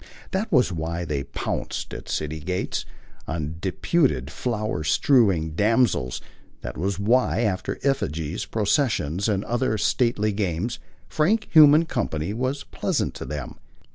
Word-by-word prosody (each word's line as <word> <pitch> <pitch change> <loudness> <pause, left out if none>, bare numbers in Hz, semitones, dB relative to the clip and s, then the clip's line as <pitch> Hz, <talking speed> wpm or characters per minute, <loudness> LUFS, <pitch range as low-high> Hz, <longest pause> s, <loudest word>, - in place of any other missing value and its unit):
That 200 +3 -2
was 125 - +4
why 85 +1 -3
they 70 -4 -2
pounced, 70 - -4
at - - -8
city 75 +1 -2
gates, 90 +4 -2 0.4
on 80 0 -3
deputed 95 - 0
flower 110 -10 -2
strewing 90 - +3
damsels; 105 - +1 0.4
that - - -6
was 95 +3 -1
why, 115 +3 +2
after 100 -5 -1
effigies, 80 - -1
processions 105 - 0
and 100 -1 0
other 120 -2 0
stately 110 -1 +1
games, 100 +2 -2 0.3
frank 205 +8 +1
human 155 0 +8
company 95 - -2
was 130 +4 -2
pleasant - - -2
to - - -7
them. 75 -3 -6
105 Hz, 130 wpm, -24 LUFS, 80-125 Hz, 0.4 s, human